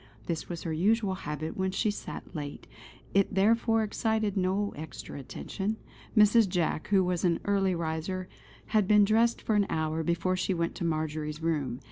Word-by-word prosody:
This 165 -2 -3
was 170 -2 -5
her 165 - -2
usual 200 +4 +2
habit 155 -3 -4
when 190 0 0
she 210 +3 +1
sat 205 - -8
late; 145 -2 -6 0.5
it 195 0 +2
therefore 225 +3 +3
excited 220 -1 0
no 195 +2 0
extra 150 -2 -8
attention. 195 - -4 0.4
Mrs. 215 0 +6
Jack 175 -3 0
who 195 -2 +4
was 180 -1 -1
an 175 -2 +2
early 195 -2 +2
riser, 170 +3 -3 0.5
had 210 -3 +4
been 210 0 +6
dressed 225 +3 +2
for 220 - 0
an 205 -1 +3
hour 160 0 -1
before 170 +3 0
she 185 0 0
went 170 0 -1
to 185 - -4
Marjory's 155 -1 -2
room. 140 -7 -1
185 Hz, 170 wpm, -29 LUFS, 160-205 Hz, 0.5 s, Mrs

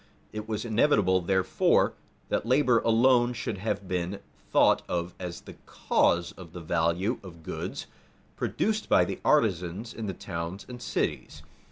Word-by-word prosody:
It 110 +1 -6
was 110 +1 -2
inevitable, 105 -6 +3
therefore, 95 +1 +2 0.4
that - - 0
labor 125 0 +3
alone 120 +2 +4
should 110 -4 -4
have 100 -1 -3
been 90 +2 -2 0.3
thought - - +5
of 85 0 -2
as 90 -2 -6
the - - -12
cause 85 0 +1
of 90 -3 -13
the 90 - -7
value 85 +7 0
of 85 -4 -12
goods - - -5 0.5
produced 220 0 -1
by - - +5
the - - -5
artisans 100 - +1
in 110 -2 -5
the 95 - -4
towns 85 +4 -5
and 125 -1 -9
cities. - - -3
100 Hz, 150 wpm, -28 LUFS, 90-115 Hz, 0.5 s, thought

